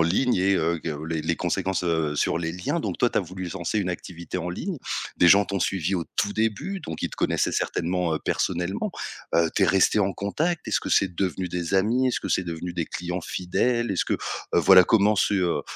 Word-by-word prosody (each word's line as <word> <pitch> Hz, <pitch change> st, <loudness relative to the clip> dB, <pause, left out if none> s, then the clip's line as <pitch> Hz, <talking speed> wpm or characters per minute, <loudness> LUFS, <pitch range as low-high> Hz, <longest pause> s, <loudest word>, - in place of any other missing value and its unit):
ligne 95 Hz, +10 st, +2 dB
et 95 Hz, +1 st, +3 dB
heu, 85 Hz, -1 st, +1 dB
que 75 Hz, -1 st, -5 dB
les 80 Hz, -1 st, -2 dB
les -, -, 0 dB
conséquences, 95 Hz, -1 st, -1 dB
heu, 80 Hz, -4 st, 0 dB
sur 75 Hz, -, +1 dB
les 80 Hz, -1 st, -3 dB
liens. 90 Hz, +1 st, -2 dB
Donc -, -, -3 dB
toi, -, -, +3 dB
tu -, -, +1 dB
as -, -, +3 dB
voulu 95 Hz, +2 st, -6 dB
lancer 95 Hz, +3 st, -2 dB
une 95 Hz, -, -2 dB
activité 85 Hz, 0 st, -6 dB
en 90 Hz, 0 st, -4 dB
ligne. 170 Hz, -, -4 dB, 0.4 s
Des 90 Hz, -, +5 dB
gens 100 Hz, +4 st, +7 dB
t'ont 100 Hz, +1 st, -3 dB
suivi 95 Hz, 0 st, 0 dB
au 85 Hz, -, -2 dB
tout 105 Hz, -, 0 dB
début, 110 Hz, -, -1 dB
donc 80 Hz, -, -7 dB
ils -, -, -1 dB
te -, -, -10 dB
connaissaient -, -, +1 dB
certainement, 90 Hz, -1 st, -1 dB
heu, -, -, -1 dB
personnellement. 90 Hz, +3 st, -1 dB, 0.4 s
Heu, 85 Hz, -1 st, +3 dB
tu 100 Hz, -, +3 dB
es -, -, +2 dB
resté 95 Hz, +4 st, +3 dB
en 100 Hz, -1 st, +2 dB
contact? 155 Hz, -, -2 dB
Est-ce -, -, +2 dB
que -, -, -5 dB
c'est 95 Hz, -2 st, +3 dB
devenu 90 Hz, 0 st, -2 dB
des 90 Hz, +1 st, -3 dB
amis? 115 Hz, +7 st, +2 dB
Est-ce 125 Hz, -, 0 dB
que -, -, -5 dB
c'est 95 Hz, -, +1 dB
devenu 85 Hz, +1 st, -5 dB
des 85 Hz, -1 st, -2 dB
clients 90 Hz, +1 st, -4 dB
fidèles? 120 Hz, +8 st, -1 dB
Est-ce 95 Hz, -, 0 dB
que, -, -, -2 dB
heu, -, -, -4 dB, 0.3 s
voilà 95 Hz, -1 st, +7 dB
comment 105 Hz, +1 st, +3 dB
s'est, 100 Hz, -, +2 dB
heu 90 Hz, -3 st, +1 dB
90 Hz, 230 wpm, -25 LUFS, 85-100 Hz, 0.4 s, gens